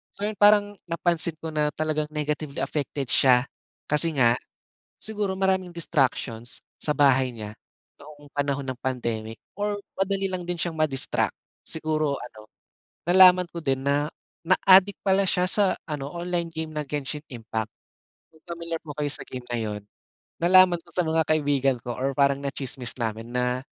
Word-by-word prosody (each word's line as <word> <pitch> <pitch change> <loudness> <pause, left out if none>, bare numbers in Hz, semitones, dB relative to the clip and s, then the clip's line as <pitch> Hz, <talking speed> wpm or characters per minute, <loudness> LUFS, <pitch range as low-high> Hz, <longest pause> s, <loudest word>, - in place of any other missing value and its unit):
So 200 - -7
yun 215 - -7
parang 205 -1 +5
napansin 170 -1 0
ko 160 - -4
na 150 -1 +1
talagang 155 -1 0
negatively 150 -1 -3
affected 140 -2 -3
siya, 125 -1 +5 0.4
kasi 150 +2 +2
nga, 120 -2 +4 0.6
siguro 210 -3 -2
maraming 190 -1 +1
distractions, 130 -7 -1 0.2
sa 150 - 0
bahay 135 -2 +4
niya, 105 -2 -7 0.5
noong 145 0 -14
panahon 140 -1 -1
ng 130 -1 -4
pandemic 115 -4 -3 0.2
or 205 0 -1 0.2
madali 195 0 0
lang 185 -1 -3
din 175 0 -2
siyang 170 -2 -1
ma-distract. 145 -4 0 0.3
Siguro 155 -2 -1
ano, 110 -3 -11 0.6
nalaman 180 -1 +7
ko 170 - -7
din 135 -1 +1
na 145 +1 +1 0.4
na-adik 190 +2 +5
pala 195 0 +3
siya 180 0 +2
sa 205 - +3 0.2
ano 145 -2 -4
online 175 -1 -2
game 160 0 -4
na 150 -1 -3
Genshin 145 +1 -4
Impact. 110 -2 -4 0.6
Kung 160 - -21
familiar 170 -1 -5
po 150 -2 -8
kayo 145 -1 -1
sa - - -1
game 125 -1 -7
na 120 - 0
yun, 105 -2 -3 0.6
nalaman 180 0 +6
ko 170 - -19
sa 180 0 +1
mga 160 0 +2
kaibigan 140 -4 +2
ko 120 0 -5
or 135 +2 0
parang 140 0 +3
na-tsismis 135 -3 -2
namin 115 +1 -3
na 125 +1 0
150 Hz, 160 wpm, -25 LUFS, 130-175 Hz, 0.6 s, nalaman